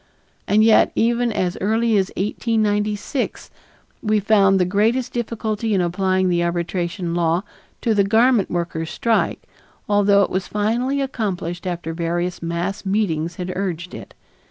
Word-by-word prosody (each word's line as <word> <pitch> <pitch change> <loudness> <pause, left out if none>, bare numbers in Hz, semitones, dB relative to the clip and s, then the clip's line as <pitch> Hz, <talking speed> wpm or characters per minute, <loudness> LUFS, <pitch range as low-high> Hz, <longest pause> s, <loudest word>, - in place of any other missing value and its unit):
And 215 +1 +4
yet 220 -1 +5
even 235 +1 +1
as 185 -4 -2
early 225 +3 +2
as 190 -2 +2
1896, 210 +3 -1 0.5
we 215 -1 +1
found 195 -2 +4
the 180 - +3
greatest 220 +7 +1
difficulty 225 -2 -2
in 190 - +2
applying 185 +1 +1
the 175 -1 +1
arbitration 170 0 -2
law 170 +1 +1 0.4
to 230 - +1
the 205 -1 +3
garment 225 +2 +3
workers' 170 -2 -3
strike, 230 -1 0 0.4
although 205 -1 +4
it - - -2
was 190 0 -2
finally 240 +7 0
accomplished 185 -9 -3
after 170 -2 -4
various 175 +2 -2
mass 170 +4 -3
meetings 175 -5 -1
had 180 +1 -4
urged 180 -2 -3
it. - - -10
195 Hz, 140 wpm, -21 LUFS, 175-220 Hz, 0.5 s, yet